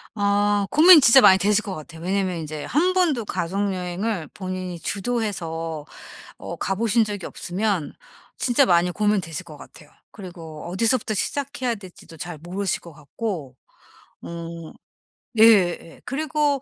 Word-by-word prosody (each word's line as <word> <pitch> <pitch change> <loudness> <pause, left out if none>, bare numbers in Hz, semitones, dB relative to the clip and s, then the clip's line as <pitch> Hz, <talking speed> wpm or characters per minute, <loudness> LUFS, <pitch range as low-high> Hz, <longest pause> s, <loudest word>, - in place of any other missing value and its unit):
아 205 0 +1
고민이 320 +1 +8
진짜 255 +2 +7
많이 190 0 +7
되실 210 +3 +2
것 200 -4 -5
같아요. 160 +1 -10
왜냐하면 190 -1 -1
인제 155 -2 -6
1 360 +5 +1
번도 315 - +1
가족여행을 185 0 -2
본인이 185 -2 -5
주도해서 170 -7 -3 0.5
어 - - -7
가 195 - -2
보신 225 +2 +2
적이 205 -3 -5
없으면 190 -3 -2 0.5
진짜 260 +2 +3
많이 175 -3 +3
고민되실 190 -4 -1
것 155 -4 -12
같아요. 150 - -15 0.2
그리고 165 -6 -10
어디서부터 225 +3 +1
시작해야 255 +1 -2
될지도 185 -4 -13
잘 170 0 -7
모르실 185 +4 -3
것 170 - -13
같고 150 - -6 0.7
오. 170 -1 -8 0.6
예예 210 -6 +6
예. 165 - -16
그리고 295 0 0
195 Hz, 305 characters per minute, -23 LUFS, 170-225 Hz, 0.7 s, 고민이